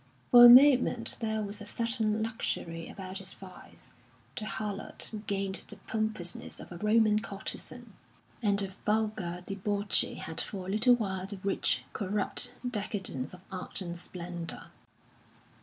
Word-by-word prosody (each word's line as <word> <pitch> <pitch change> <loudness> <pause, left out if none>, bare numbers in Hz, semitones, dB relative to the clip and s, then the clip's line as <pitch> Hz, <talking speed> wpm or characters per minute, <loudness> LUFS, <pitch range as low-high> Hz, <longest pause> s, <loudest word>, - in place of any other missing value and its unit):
For 240 -1 +10
a - - +12
moment 250 -2 +6
there 220 -2 -1
was 205 +1 -6
a - - -7
certain 220 -1 -1
luxury 170 -7 -3
about 190 0 -7
its 190 -1 -8
vice; 185 -2 -13 0.4
the 215 - -4
harlot 210 0 -2
gained 195 -1 -1
the 210 - -9
pompousness 215 -3 -2
of - - -11
a 175 - -7
Roman 215 +1 +3
courtesan, 195 -2 -5 0.5
and 205 -3 +2
the 195 -1 0
vulgar 210 -5 -1
debauchee 200 +1 +1
had 160 0 -3
for 190 -3 -5
a 190 - -4
little 235 +4 +5
while 190 -5 -3
the 200 - -7
rich, 195 0 +1
corrupt 210 +4 0
decadence 200 - 0
of 180 - -16
art 185 -1 -5
and 175 -2 -6
splendour. 175 -1 -7
205 Hz, 140 wpm, -30 LUFS, 185-220 Hz, 0.5 s, a